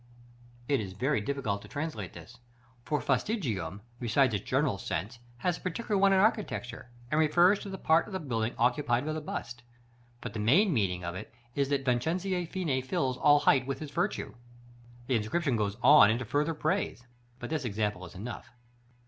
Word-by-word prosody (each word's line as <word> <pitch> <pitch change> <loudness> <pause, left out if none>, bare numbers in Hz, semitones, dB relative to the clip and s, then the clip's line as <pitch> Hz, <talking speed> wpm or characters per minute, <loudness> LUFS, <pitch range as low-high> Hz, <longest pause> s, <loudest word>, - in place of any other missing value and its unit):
It 140 -2 +2
is 95 -3 -5
very 130 +4 0
difficult 105 -4 -2
to - - -12
translate 145 - -5
this; 110 +9 -12 0.4
for 150 +3 -1
fastigium, 115 - -1 0.2
besides 125 +1 +2
its 100 - -1
general - - +1
sense, 105 +10 -4 0.2
has 175 +7 -1
a - - -20
particular 205 +4 -2
one 195 0 +4
in 190 - +4
architecture, 190 - 0 0.2
and 155 - +2
refers 175 +6 +5
to 200 - -7
the 190 - -5
part 160 -1 +3
of 205 - -9
the 190 - -2
building 120 -7 -2
occupied 125 +1 +1
by 155 - -2
the 155 - -3
bust; 120 -5 -6 0.6
but 105 - -7
the 110 - -4
main 165 - +4
meaning 90 -7 0
of 85 0 -3
it 100 +4 -8 0.2
is 140 0 0
that 140 -1 0
"Vincenzo 175 +9 0
Fini 160 -8 -1
fills 130 0 -1
all 145 0 +5
height 130 -2 +3
with 135 - -2
his 150 -2 -7
virtue." - - -2 0.7
The 125 -1 +2
inscription 130 +6 0
goes 105 -1 -1
on 135 -5 +8
into 120 +3 0
farther 150 +7 0
praise, 150 -5 -1 0.3
but 120 +2 -7
this 155 -4 -1
example 105 -4 -2
is 85 - -10
enough. 115 +6 -7
130 Hz, 185 wpm, -30 LUFS, 110-155 Hz, 0.7 s, on